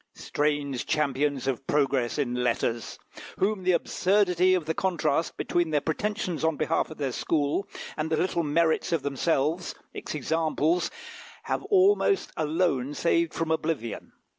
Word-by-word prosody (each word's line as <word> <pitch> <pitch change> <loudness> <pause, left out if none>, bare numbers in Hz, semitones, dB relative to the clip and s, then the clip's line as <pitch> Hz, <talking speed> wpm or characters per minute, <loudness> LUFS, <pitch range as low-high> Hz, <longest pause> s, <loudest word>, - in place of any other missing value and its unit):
Strange 145 -3 -1
champions 145 -2 0
of 135 0 -2
progress 135 -4 +1
in 135 -5 0
letters! 120 -2 -1 0.4
whom 200 0 +1
the 185 0 +2
absurdity 185 0 +3
of 175 -4 -2
the 160 - -1
contrast 165 -4 0
between 175 -2 0
their 150 -1 +2
pretensions 185 +2 -2
on 160 -2 +1
behalf 165 - 0
of 155 - -9
their 140 -3 -1
school 150 +7 0 0.3
and 155 +1 -2
the 160 - +1
little 175 0 +1
merits 160 +2 +1
of 165 -5 0
themselves, 150 +4 0 0.2
its - - -6
examples, 160 +3 +1 0.5
have - - -2
almost 400 0 +3
alone 150 -3 0
saved 170 0 +2
from 165 -1 -2
oblivion. 155 -8 -2
155 Hz, 140 wpm, -27 LUFS, 140-175 Hz, 0.5 s, absurdity